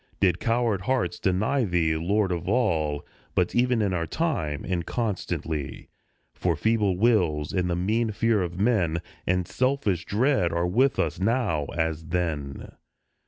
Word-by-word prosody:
Did 90 Hz, -3 st, +2 dB
coward 115 Hz, -4 st, +1 dB
hearts 130 Hz, +5 st, -1 dB
deny 105 Hz, +8 st, +1 dB
Thee, 85 Hz, -5 st, +1 dB
Lord 95 Hz, +4 st, +1 dB
of 85 Hz, -1 st, -3 dB
all, 80 Hz, -, +1 dB, 0.3 s
But -, -, +1 dB
even 125 Hz, -2 st, +2 dB
in 100 Hz, -2 st, 0 dB
our 85 Hz, -2 st, -1 dB
time, 90 Hz, -, -2 dB
and 90 Hz, -2 st, -1 dB
constantly; 85 Hz, -, -3 dB, 0.4 s
For -, -, 0 dB
feeble 105 Hz, -5 st, +1 dB
wills, 90 Hz, -10 st, +2 dB
and 90 Hz, -1 st, 0 dB
the 85 Hz, -, 0 dB
mean 110 Hz, +6 st, 0 dB
fear 110 Hz, 0 st, +1 dB
of 90 Hz, 0 st, -4 dB
men, 90 Hz, -7 st, +1 dB, 0.2 s
And 90 Hz, 0 st, +1 dB
selfish 130 Hz, -, 0 dB
dread, 115 Hz, -4 st, +2 dB
are 85 Hz, +1 st, 0 dB
with 125 Hz, +10 st, +2 dB
us -, -, -1 dB
now 100 Hz, -, +1 dB
as 80 Hz, -1 st, -1 dB
then. 80 Hz, -6 st, -3 dB
95 Hz, 150 wpm, -26 LUFS, 85-115 Hz, 0.4 s, Did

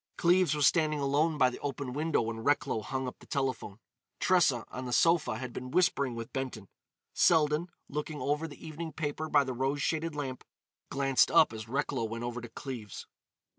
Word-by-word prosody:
Cleves 175 Hz, -3 st, +4 dB
was 150 Hz, -1 st, +3 dB
standing 155 Hz, -1 st, +3 dB
alone 145 Hz, +3 st, +1 dB
by 130 Hz, -3 st, +4 dB
the -, -, -8 dB
open 140 Hz, -2 st, -4 dB
window 155 Hz, -2 st, +1 dB
when 115 Hz, 0 st, -4 dB
Recklow 145 Hz, -5 st, +1 dB
hung 130 Hz, +4 st, -3 dB
up 125 Hz, -, -7 dB
the -, -, -17 dB
telephone. 130 Hz, -7 st, -2 dB, 0.4 s
Tressa, 160 Hz, -10 st, +3 dB
on 130 Hz, +1 st, -5 dB
the 125 Hz, -, -3 dB
sofa, 165 Hz, -3 st, +3 dB
had 125 Hz, 0 st, -6 dB
been 125 Hz, 0 st, -6 dB
whispering 140 Hz, -6 st, +2 dB
with 115 Hz, 0 st, -7 dB
Benton. 125 Hz, -7 st, -4 dB, 0.4 s
Selden, 155 Hz, 0 st, +3 dB, 0.2 s
looking 150 Hz, +1 st, -4 dB
over 150 Hz, +3 st, -1 dB
the 145 Hz, -, -12 dB
evening 160 Hz, 0 st, -6 dB
paper 155 Hz, +1 st, -3 dB
by 145 Hz, -2 st, +5 dB
the 130 Hz, -1 st, -4 dB
rose 135 Hz, +3 st, -1 dB
shaded 160 Hz, 0 st, -1 dB
lamp, 135 Hz, -3 st, -4 dB, 0.5 s
glanced 135 Hz, -1 st, +3 dB
up -, -, +5 dB
as 110 Hz, 0 st, -7 dB
Recklow 135 Hz, -2 st, -1 dB
went 115 Hz, +1 st, -5 dB
over 120 Hz, 0 st, -4 dB
to 120 Hz, -, -8 dB
Cleves. 115 Hz, -4 st, -7 dB
140 Hz, 185 wpm, -30 LUFS, 125-155 Hz, 0.5 s, by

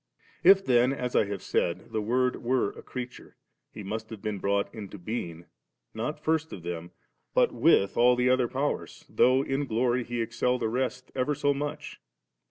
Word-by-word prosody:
If 195 Hz, +2 st, +7 dB
then, 125 Hz, +1 st, +4 dB
as 125 Hz, -2 st, -3 dB
I -, -, +4 dB
have 100 Hz, 0 st, -5 dB
said, 85 Hz, +1 st, -1 dB
the 110 Hz, -, -1 dB
Word 125 Hz, +4 st, +1 dB
were 125 Hz, -3 st, +1 dB
creature, 125 Hz, -1 st, -8 dB, 0.3 s
He 105 Hz, -, -8 dB
must 110 Hz, +3 st, -5 dB
have 110 Hz, -, -8 dB
been 105 Hz, -1 st, -3 dB
brought 100 Hz, +1 st, 0 dB
into 105 Hz, -3 st, -8 dB
being, 85 Hz, -4 st, -5 dB, 0.5 s
not 125 Hz, +7 st, -3 dB
first 160 Hz, +1 st, 0 dB
of 90 Hz, -, -8 dB
them, 85 Hz, 0 st, -5 dB, 0.5 s
but -, -, +4 dB
with 100 Hz, -, +3 dB
all 125 Hz, +1 st, +6 dB
the 125 Hz, 0 st, +1 dB
other 130 Hz, -1 st, +3 dB
Powers, 140 Hz, +4 st, -3 dB
though 130 Hz, +2 st, +3 dB
in 140 Hz, +1 st, -2 dB
gloiy 120 Hz, +2 st, +1 dB
He 120 Hz, 0 st, -4 dB
excel 120 Hz, +2 st, 0 dB
the 115 Hz, -3 st, -1 dB
rest 125 Hz, +1 st, -2 dB
ever 135 Hz, +3 st, 0 dB
so 145 Hz, +1 st, +2 dB
much. 145 Hz, +1 st, -5 dB
120 Hz, 180 wpm, -28 LUFS, 105-130 Hz, 0.5 s, If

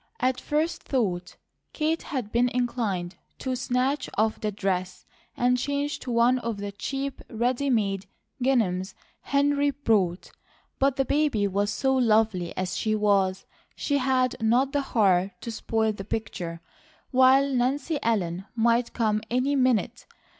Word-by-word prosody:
At 255 Hz, 0 st, 0 dB
first 310 Hz, +3 st, -1 dB
thought 185 Hz, -9 st, -2 dB, 0.4 s
Kate 315 Hz, +1 st, 0 dB
had 255 Hz, -9 st, -4 dB
been 245 Hz, +1 st, +3 dB
inclined 220 Hz, -8 st, -2 dB, 0.2 s
to 260 Hz, -1 st, -2 dB
snatch 255 Hz, +3 st, 0 dB
off 220 Hz, +1 st, +1 dB
the 215 Hz, -, -1 dB
dress 185 Hz, -2 st, -2 dB, 0.3 s
and 250 Hz, +1 st, +2 dB
change 285 Hz, +3 st, -2 dB
to 250 Hz, -, -6 dB
one 240 Hz, +2 st, +3 dB
of 230 Hz, -3 st, -3 dB
the 200 Hz, 0 st, -5 dB
cheap, 270 Hz, +6 st, -4 dB
ready 245 Hz, +4 st, 0 dB
made 200 Hz, -5 st, 0 dB, 0.4 s
ginghams 200 Hz, -8 st, +1 dB, 0.3 s
Henry 285 Hz, 0 st, +2 dB
brought, 215 Hz, -10 st, 0 dB, 0.5 s
but 275 Hz, -1 st, +3 dB
the 270 Hz, -, +1 dB
baby 285 Hz, -8 st, +1 dB
was 200 Hz, +1 st, 0 dB
so 265 Hz, +5 st, +1 dB
lovely 220 Hz, -7 st, +2 dB
as 185 Hz, -1 st, -2 dB
she 215 Hz, -1 st, 0 dB
was, 200 Hz, -3 st, +1 dB, 0.3 s
she 285 Hz, -1 st, 0 dB
had 255 Hz, -1 st, +1 dB
not 245 Hz, +5 st, +3 dB
the 285 Hz, -, +1 dB
heart 195 Hz, -7 st, +1 dB
to 230 Hz, -, -5 dB
spoil 220 Hz, 0 st, 0 dB
the 200 Hz, -, -7 dB
picture, 180 Hz, -6 st, -4 dB, 0.5 s
while 265 Hz, +1 st, +5 dB
Nancy 270 Hz, +5 st, 0 dB
Ellen 190 Hz, -5 st, -1 dB
might 235 Hz, +1 st, +2 dB
come 215 Hz, -2 st, +1 dB
any 255 Hz, +4 st, +1 dB
minute. 255 Hz, -5 st, +1 dB
235 Hz, 145 wpm, -26 LUFS, 200-265 Hz, 0.5 s, while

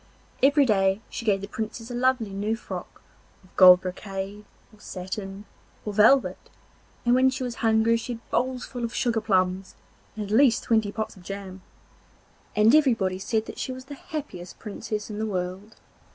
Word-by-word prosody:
Every 285 Hz, +1 st, +5 dB
day 195 Hz, -3 st, +2 dB
she 230 Hz, -, -6 dB
gave 200 Hz, -3 st, +2 dB
the 200 Hz, -, -6 dB
Princess 225 Hz, +3 st, -6 dB
a -, -, -4 dB
lovely 245 Hz, -3 st, +1 dB
new 205 Hz, +3 st, -1 dB
frock 225 Hz, -, -8 dB, 0.4 s
of 185 Hz, -, -24 dB
gold 180 Hz, -1 st, +9 dB
brocade, 195 Hz, +2 st, -6 dB, 0.3 s
or 215 Hz, -, -19 dB
satin, 195 Hz, +1 st, -6 dB, 0.4 s
or 210 Hz, -, -3 dB
velvet, 225 Hz, +6 st, +3 dB, 0.6 s
and 240 Hz, -, +4 dB
when 260 Hz, +1 st, +5 dB
she 260 Hz, 0 st, -4 dB
was 245 Hz, -2 st, -4 dB
hungry 225 Hz, 0 st, +3 dB
she 235 Hz, +2 st, -5 dB
had 230 Hz, -, -12 dB
bowls 255 Hz, 0 st, 0 dB
full 245 Hz, -2 st, -6 dB
of 235 Hz, 0 st, -3 dB
sugar 230 Hz, -3 st, +1 dB
plums, 190 Hz, -2 st, 0 dB, 0.4 s
and 215 Hz, -1 st, -4 dB
at 200 Hz, -, -8 dB
least 255 Hz, -2 st, +4 dB
twenty 220 Hz, -3 st, +1 dB
pots 220 Hz, +1 st, -4 dB
of -, -, -14 dB
jam. 190 Hz, 0 st, -7 dB, 0.9 s
Everybody 220 Hz, -5 st, +4 dB
said 220 Hz, +3 st, -2 dB
she -, -, -3 dB
was 255 Hz, 0 st, -8 dB
the 285 Hz, -, -9 dB
happiest 275 Hz, -, -7 dB
Princess 210 Hz, 0 st, -5 dB
in 210 Hz, -, -5 dB
the 220 Hz, -, -1 dB
world. 190 Hz, +2 st, -4 dB
215 Hz, 170 wpm, -25 LUFS, 195-240 Hz, 0.9 s, gold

